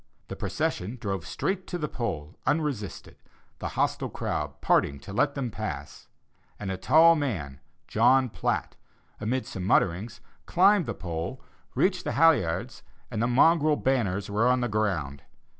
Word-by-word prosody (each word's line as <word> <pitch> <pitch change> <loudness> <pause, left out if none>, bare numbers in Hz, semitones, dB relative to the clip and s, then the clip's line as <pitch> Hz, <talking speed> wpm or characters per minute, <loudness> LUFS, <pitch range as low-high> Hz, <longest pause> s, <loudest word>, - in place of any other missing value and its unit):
The - - -5
procession 105 +8 -2
drove 95 -5 -3
straight 190 -1 -2
to 175 - -3
the 150 -3 -2
pole 90 - -4
unresisted, 145 -10 -2 0.4
the - - -3
hostile - - 0
crowd 75 -1 -3
parting 70 0 +2
to 100 - -9
let 140 +7 +1
them 130 -4 -3
pass; - - -6 0.5
and 100 -2 -4
a - - -2
tall 160 - +6
man, 90 - -3 0.3
John 130 -1 +4
Platt, 85 -6 -2 0.4
amid 125 +5 -1
some 95 - -6
mutterings, 100 +4 +1 0.3
climbed 190 -2 +4
the 115 - -3
pole, 85 +8 -5 0.4
reached 185 -1 +1
the - - -2
halliards, 140 - +2 0.3
and 110 - -2
the 120 - +2
mongrel 150 +4 +4
banners 105 -9 0
were 105 +4 +1
on 125 0 +3
the 120 - +1
ground. 95 - -1
115 Hz, 150 wpm, -27 LUFS, 95-145 Hz, 0.5 s, tall